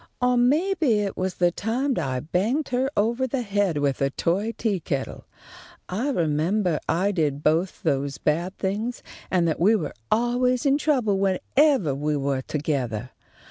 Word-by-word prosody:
"Or 250 0 +2
maybe 295 - +2
it 200 -1 -3
was 185 0 -2
the 175 -1 +2
time 245 +9 -1
I 130 -2 -2
banged 215 - -1
her 255 +2 0
ovah 235 +5 +1
the 255 0 -2
head 200 -6 0
with 140 -2 0
a 135 - +2
toy 190 +10 -1
teakettle. 180 - -3 0.6
I 225 +10 -1
remembah 170 - +1
I 185 +5 +2
did 150 -6 -1
both 165 +5 +1
those 140 -3 0
bad 170 +6 -1
things, 210 +5 -3 0.3
and 175 -2 +2
that 160 - -1
we 205 +7 +5
were 160 -9 -3 0.2
always 245 +3 +1
in 280 +1 +3
trouble 250 -11 +1
whenevah 195 - +2
we 150 +1 -1
were 140 -1 -1
togethah. 130 -6 -3
190 Hz, 155 wpm, -24 LUFS, 150-245 Hz, 0.6 s, we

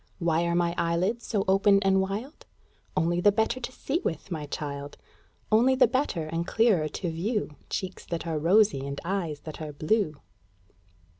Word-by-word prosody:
"Why 170 -1 +1
are 170 0 0
my 170 -1 +1
eyelids 175 +8 0
so 205 -4 0
open 195 +1 +5
and 190 0 +4
wild?" 210 +10 -5 0.5
Only 175 +2 +2
the 205 - +6
better 220 +4 0
to 255 - -5
see 290 +6 -2
with, 160 +4 -3
my 155 -3 -4
child! 145 -1 -5 0.5
Only 245 +5 +5
the 260 -1 +6
better 245 - 0
and 165 +2 -3
clearer 210 -9 +3
to 170 +3 -4
view 200 +3 -2 0.2
Cheeks 190 -1 -4
that 170 -1 -3
are 160 -2 -1
rosy 180 -3 +4
and 140 0 -4
eyes 170 -6 -2
that 155 +1 -8
are 155 -1 -5
blue. 155 0 0
175 Hz, 170 wpm, -27 LUFS, 160-215 Hz, 0.5 s, the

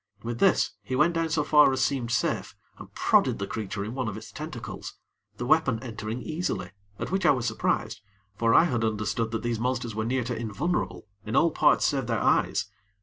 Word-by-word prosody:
With 120 0 -4
this, - - +3
he 130 - -4
went 155 +6 +3
down 165 -1 0
so 155 -1 +1
far 150 -1 +6
as 130 - -1
seemed 130 -4 -1
safe, 120 - -1 0.2
and - - -11
prodded - - +3
the 100 - -3
creature 100 -1 -4
in 110 - -5
one 130 -2 -2
of 105 - -4
its - - -10
tentacles - - -7 0.4
the 120 - -4
weapon 140 -4 +3
entering 110 0 -5
easily, 170 +3 -3 0.3
at - - -5
which 190 0 0
I 175 - +5
was 125 -4 +2
surprised, 110 -3 -1 0.3
for 115 +2 +2
I - - +8
had 125 -9 0
understood 110 +1 -1
that 115 -1 -3
these 120 -2 -1
monsters 125 -1 -1
were 110 +1 -2
near 125 +3 0
to 120 +1 -3
invulnerable 120 - -2 0.2
in 110 - -4
all 165 +1 +4
parts - - +3
save 135 -4 0
their 115 -2 0
eyes. 105 - +2
120 Hz, 205 wpm, -27 LUFS, 110-145 Hz, 0.4 s, I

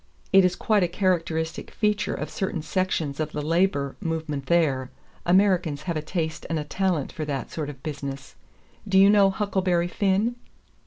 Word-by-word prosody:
It 195 0 +8
is 180 -1 +2
quite 210 +1 +2
a 180 - +3
characteristic 165 -3 -1
feature 210 -1 0
of - - -5
certain 185 -4 -3
sections 165 -6 -1
of 155 -1 -2
the 150 - -2
labor 155 -4 +1
movement 160 -5 -3
there. 140 -7 +2 0.4
Americans 180 -5 +3
have 170 +1 -2
a 155 - -1
taste 160 0 -3
and 165 - 0
a 150 - -2
talent 175 -2 -1
for 155 - -5
that 140 -3 -4
sort 150 -3 -4
of 135 -3 -10
business. 140 -3 -6 0.5
Do 190 -1 +2
you 195 +1 +7
know 200 -2 +6
'Huckleberry 190 -3 0
Finn?'" 200 +6 +1
170 Hz, 170 wpm, -25 LUFS, 150-190 Hz, 0.5 s, It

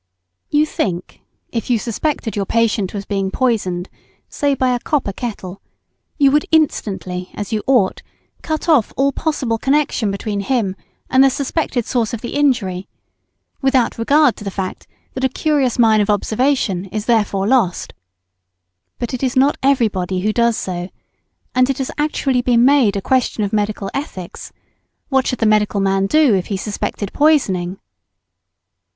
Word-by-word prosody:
You 300 +1 +3
think, 180 - -4 0.3
if 230 +1 -3
you 245 - +3
suspected 235 +2 -2
your 200 -2 -2
patient 225 -4 +1
was 200 -1 -5
being 195 -2 -1
poisoned, 190 -7 -1 0.4
say, 285 -2 0
by 255 -1 +1
a 245 - -1
copper 265 -7 -1
kettle, 200 -5 -6 0.6
you 280 -3 +4
would 295 +1 +2
instantly, 190 - 0
as 205 +1 -5
you 215 - 0
ought, 245 -8 +2 0.4
cut 315 +1 -3
off 295 -10 +3
all 275 +1 +3
possible 265 -7 -2
connection 270 -5 +1
between 200 +1 -3
him 200 -2 0 0.3
and 260 +1 +5
the 270 - +6
suspected 270 -3 -2
source 235 -1 -1
of 235 - -8
injury, 240 -10 0 0.7
without 265 -4 +1
regard 280 +2 +4
to - - -9
the 200 - -3
fact 190 -1 -5 0.3
that 260 - -5
a 265 - +3
curious 275 -2 0
mine 220 -3 +5
of 205 - -1
observation 215 -2 +1
is 210 +2 -5
thereby 210 -4 +1
lost. 215 -6 +1 1.0
But 240 +1 -4
it 255 - -3
is 260 -2 -1
not 270 +3 +4
everybody 205 -9 +1
who 215 +2 0
does 235 -1 +2
so, 180 -1 -4 0.6
and 255 +1 +3
it 270 - 0
has 265 -2 -3
actually 275 -4 +1
been 240 -1 +3
made 260 -7 +4
a 195 - -3
question 255 -4 +1
of 200 - -3
medical 210 -1 -1
ethics, 190 - -6 0.6
what 265 -2 +2
should 250 - -1
the 225 - 0
medical 210 -1 +2
man 195 0 +1
do 305 -2 +4
if 185 -2 0
he 200 - -2
suspected 205 0 -4
poisoning? 195 - +2
230 Hz, 160 wpm, -18 LUFS, 200-270 Hz, 1.0 s, the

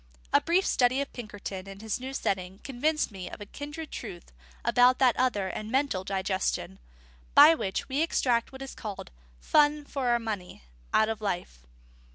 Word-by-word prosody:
A - - +6
brief 360 +3 +2
study 250 +1 +3
of 280 - -3
Pinkerton 205 -4 -7
in 195 0 -9
his 220 +1 -3
new 260 +1 -5
setting 190 -7 -2
convinced 290 +2 0
me 185 -3 -7
of - - -9
a 205 - -7
kindred 295 +7 -7
truth 175 - -8 0.3
about 250 +1 +5
that 255 -3 +4
other 245 -7 +1
and 215 +3 -5
mental 265 -7 0
digestion, 190 - -2 0.6
by 325 - +10
which 195 -12 -3
we 275 +3 0
extract 245 -7 +1
what 265 0 -8
is 270 - -8
called 205 - -7 0.3
"fun 295 - +3
for 275 -3 -3
our 240 0 +4
money" 210 - -5 0.3
out 220 - +4
of 220 -1 -3
life. 175 - -4
235 Hz, 175 wpm, -28 LUFS, 195-270 Hz, 0.6 s, by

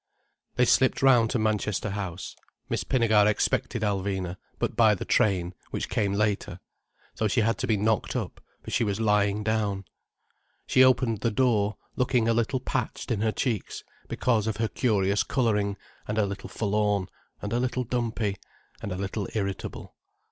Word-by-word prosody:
They 125 - +4
slipped 130 +2 +3
round 120 -4 +5
to - - 0
Manchester 105 -2 0
House. 95 -3 -5 0.3
Miss - - -1
Pinnegar 110 -5 +3
expected 105 +1 0
Alvina, 95 -3 -1 0.2
but - - -2
by - - +5
the - - -6
train, 95 -4 +2 0.2
which - - -4
came 100 -2 0
later. 100 -2 -1 0.5
So 110 - 0
she 115 - +2
had 115 +1 +1
to - - -1
be 110 - +2
knocked 110 +1 0
up, - - -4 0.2
for - - -7
she - - +2
was 100 -1 -1
lying 105 -1 +2
down. 105 -3 -1 0.8
She 130 - +5
opened 125 -4 +3
the 115 - +1
door 110 -3 +1 0.2
looking 125 -2 +1
a 115 - +3
little 120 +3 0
patched - - -3
in 105 -3 0
her 110 0 +2
cheeks, 115 -4 -2 0.2
because 115 -4 +1
of 110 -2 -1
her 115 0 +1
curious 105 -5 +1
colouring, 105 -6 0 0.3
and 105 - -2
a 110 - +3
little 100 0 -6
forlorn, 105 -2 0 0.3
and 105 +2 -4
a 120 - +1
little 125 0 -1
dumpy, 115 -4 -2 0.4
and 100 - -5
a - - -2
little 100 +1 -3
irritable. 100 -3 -4
105 Hz, 170 wpm, -27 LUFS, 100-115 Hz, 0.8 s, round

